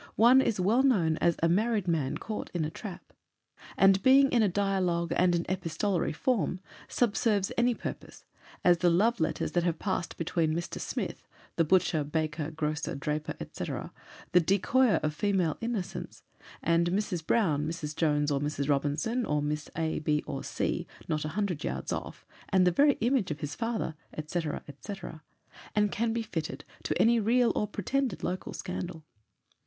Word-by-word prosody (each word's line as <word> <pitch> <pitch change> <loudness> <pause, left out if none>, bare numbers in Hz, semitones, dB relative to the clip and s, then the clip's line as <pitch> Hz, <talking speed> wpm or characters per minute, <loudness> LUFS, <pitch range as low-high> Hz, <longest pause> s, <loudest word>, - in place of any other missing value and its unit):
One 245 +4 +7
is 220 -6 0
well 210 +8 +3
known 180 -13 +3
as 170 -1 +2
a - - +6
"Married 210 +2 +1
Man 155 -6 0
caught 215 -1 -5
in 165 -3 0
a 155 - -4
Trap." 190 -1 -9 0.6
And 195 0 +5
being 270 +3 +6
in 240 - +4
a 210 - +3
dialogue 185 -3 0
and 180 -1 +3
an 170 - -1
epistolary 185 0 -1
form, 195 +1 0 0.3
subserves 210 -4 +1
any 240 0 +2
purpose: - - -7 0.4
as 175 -1 +5
the 175 - +4
'Love 215 +8 +3
Letters,' 160 - -1
that 175 - +2
have 170 -2 0
passed 190 -2 -3
between 165 -2 0
Mr. 170 +1 -4
Smith, - - -4 0.3
the 165 - +3
butcher, 165 -2 +2
baker, 155 +1 -2
grocer, 155 -1 -2
draper, 150 +2 -3 0.2
&c. - - -5
'the 180 - -2
decoyer 205 +7 +3
of 155 0 0
female 185 -3 +1
innocence' 230 -5 -4 0.4
and 170 +1 +3
Mrs. 185 -3 -1
Brown, 155 -7 +1
Mrs. 155 -2 -4
Jones, 150 -2 +1
or 140 - +1
Mrs. 145 -1 -2
Robinson, 150 - 0
or 150 -8 0
Miss 150 0 -3
A, 160 0 -1
B, 150 -1 0
or - - -5
C, - - -2 0.2
not 155 -1 -1
100 175 0 -2
yards - - -3
off - - -6 0.2
'And 185 -1 +4
the 180 - +4
very 285 - +5
image 240 -3 +2
of 150 -2 -4
his 145 -1 -3
father,' 230 -5 -2 0.3
&c., 175 +3 -2
&c. 150 +3 -5 0.8
and 210 -1 +3
can 230 +1 0
be 230 0 -1
fitted 165 -7 -5 0.2
to - - -1
any 235 +1 +5
real 235 +3 +3
or 210 - 0
pretended 235 +3 -2
local 180 +1 -3
scandal. 180 -3 -5
180 Hz, 170 wpm, -29 LUFS, 155-215 Hz, 0.8 s, One